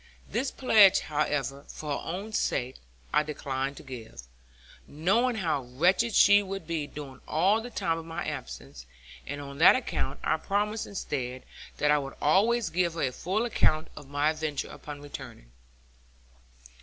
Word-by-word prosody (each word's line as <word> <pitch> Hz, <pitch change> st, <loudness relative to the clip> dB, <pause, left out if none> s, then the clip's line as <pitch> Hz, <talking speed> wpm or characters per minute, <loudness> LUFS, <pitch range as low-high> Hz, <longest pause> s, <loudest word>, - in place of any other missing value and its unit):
This 260 Hz, +3 st, -1 dB
pledge, 210 Hz, -7 st, +6 dB
however, 145 Hz, -2 st, -1 dB
for 150 Hz, -1 st, -6 dB
her -, -, -10 dB
own 200 Hz, +6 st, -5 dB
sake, 130 Hz, -9 st, -1 dB, 0.4 s
I -, -, +5 dB
declined 140 Hz, -2 st, -3 dB
to -, -, -10 dB
give; 120 Hz, -, -9 dB, 0.6 s
knowing 200 Hz, -, +1 dB
how 160 Hz, -9 st, 0 dB
wretched 180 Hz, -, +2 dB
she 205 Hz, 0 st, +7 dB
would 195 Hz, -3 st, -6 dB
be 155 Hz, -3 st, -2 dB
during 140 Hz, -2 st, -9 dB
all 190 Hz, +8 st, +3 dB
the 245 Hz, -, -7 dB
time 165 Hz, -8 st, -1 dB
of 165 Hz, -, -9 dB
my 165 Hz, 0 st, -4 dB
absence; 65 Hz, 0 st, -7 dB, 0.4 s
and, 145 Hz, +1 st, -4 dB
on 140 Hz, 0 st, -8 dB
that 165 Hz, -, +8 dB
account, 255 Hz, -, -2 dB
I -, -, +2 dB
promised 210 Hz, +2 st, -1 dB
instead, 130 Hz, -9 st, -4 dB, 0.3 s
that 150 Hz, -, +3 dB
I 150 Hz, -, +4 dB
would 135 Hz, -1 st, -6 dB
always 205 Hz, +6 st, +3 dB
give 170 Hz, 0 st, +1 dB
her 165 Hz, -, -1 dB
a 130 Hz, -, +1 dB
full 190 Hz, -, -1 dB
account 155 Hz, -9 st, +2 dB
of 145 Hz, -3 st, -11 dB
my 145 Hz, +2 st, +2 dB
adventure 155 Hz, -2 st, -3 dB
upon 145 Hz, -1 st, -9 dB
returning. 125 Hz, -, -10 dB
155 Hz, 160 wpm, -28 LUFS, 140-195 Hz, 0.6 s, that